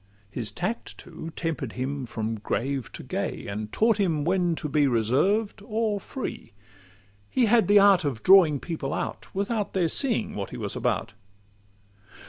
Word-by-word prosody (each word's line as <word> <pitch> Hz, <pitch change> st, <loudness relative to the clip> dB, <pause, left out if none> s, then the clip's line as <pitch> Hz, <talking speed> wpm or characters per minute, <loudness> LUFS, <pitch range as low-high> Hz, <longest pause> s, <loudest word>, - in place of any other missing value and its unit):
His 115 Hz, -4 st, -3 dB
tact, 195 Hz, +7 st, -4 dB
too, 165 Hz, -1 st, -9 dB
temper'd 155 Hz, -8 st, -3 dB
him 130 Hz, 0 st, -3 dB
from 110 Hz, -1 st, -3 dB
grave 130 Hz, +4 st, -2 dB
to -, -, -7 dB
gay, -, -, -3 dB
And 105 Hz, +1 st, -5 dB
taught 225 Hz, -1 st, +3 dB
him 160 Hz, -7 st, +1 dB
when 175 Hz, -1 st, +1 dB
to 155 Hz, -, -4 dB
be 145 Hz, 0 st, +2 dB
reserved 145 Hz, -, +1 dB
or 215 Hz, -1 st, -1 dB
free: 140 Hz, -, -6 dB, 0.8 s
He 255 Hz, -, +2 dB
had 225 Hz, +1 st, +4 dB
the 205 Hz, +1 st, +6 dB
art 200 Hz, -3 st, +6 dB
of 135 Hz, -7 st, -3 dB
drawing 180 Hz, -7 st, +6 dB
people 155 Hz, -4 st, -4 dB
out, -, -, -4 dB
Without 205 Hz, +1 st, -1 dB
their 180 Hz, -3 st, +2 dB
seeing 230 Hz, -, +1 dB
what 100 Hz, -1 st, -4 dB
he -, -, -7 dB
was -, -, -3 dB
about. -, -, -1 dB
165 Hz, 160 wpm, -26 LUFS, 135-205 Hz, 0.8 s, the